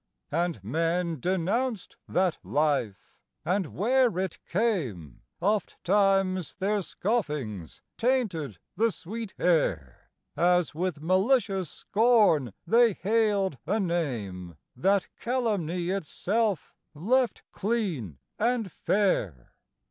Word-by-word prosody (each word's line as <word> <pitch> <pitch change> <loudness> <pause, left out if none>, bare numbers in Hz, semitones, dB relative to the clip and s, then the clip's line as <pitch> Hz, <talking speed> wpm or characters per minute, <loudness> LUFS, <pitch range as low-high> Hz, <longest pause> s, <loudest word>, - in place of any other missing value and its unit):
And 165 - -1
men 165 - 0
denounced 190 - -1
that 180 -2 +1
Life; 145 -9 -1 0.3
and 185 0 +1
where 240 - +2
it 185 -2 -2
came 140 - -1 0.2
Ofttimes 195 -3 +1
their 205 +2 0
scoffings 150 - -3 0.2
tainted 210 - 0 0.2
the 225 +3 +2
sweet 210 +5 -7
air, 95 - 0 0.3
As 175 +1 +2
with 165 -2 -3
malicious 195 - +2
scorn 210 - +3
they 235 -1 +5
hailed 200 - +1
a 215 +3 +1
name 115 - -2 0.2
That 195 +9 +2
calumny 200 -9 -1
itself 195 +1 -1 0.2
left 235 - +1
clean 185 - -2 0.2
and 230 -3 0
fair. 110 - 0
185 Hz, 95 wpm, -28 LUFS, 150-215 Hz, 0.3 s, they